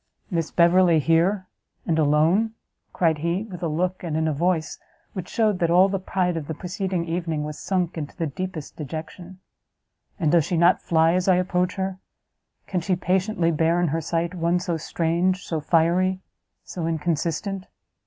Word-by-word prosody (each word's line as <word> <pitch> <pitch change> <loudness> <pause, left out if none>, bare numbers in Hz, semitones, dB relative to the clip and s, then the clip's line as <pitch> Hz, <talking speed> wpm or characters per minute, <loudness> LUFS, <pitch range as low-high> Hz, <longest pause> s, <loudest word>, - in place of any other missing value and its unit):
"Miss 165 -2 -1
Beverley 175 0 +4
here! 170 +6 +2 0.4
and 160 -1 +1
alone!" 160 +9 +3 0.4
cried 160 -3 +1
he, 170 +5 -1
with 185 -6 -9
a 170 - 0
look, 180 +4 -1
and 160 -3 -2
in 160 0 +1
a 155 - +1
voice, 165 +1 -1 0.3
which 185 -2 -6
shewed 215 -4 +1
that 170 - +1
all 180 +3 +5
the 195 0 -1
pride 180 -1 -1
of 155 -3 -4
the 160 - -4
preceding 185 -1 -3
evening 165 -2 -2
was 150 0 -6
sunk 180 -4 -1
into 145 -2 -6
the 165 - -1
deepest 160 +1 -5
dejection; 160 +4 -7 0.8
"and 155 -5 +2
does 170 -2 +5
she 175 - -1
not 175 +2 +4
fly 165 0 +3
as 185 +1 0
I 185 - +6
approach 180 0 0
her? 190 -1 -3 0.7
can 180 -2 -2
she 185 +2 0
patiently 180 -1 +1
bear 165 +2 +2
in 175 -2 +1
her 165 +3 -1
sight 165 +2 -1
one 170 0 +1
so 175 -1 -2
strange, 170 +3 0
so 160 - -2
fiery, 175 +4 +2 0.4
so 170 -3 -4
inconsistent? 170 +4 -2
170 Hz, 175 wpm, -24 LUFS, 160-185 Hz, 0.8 s, I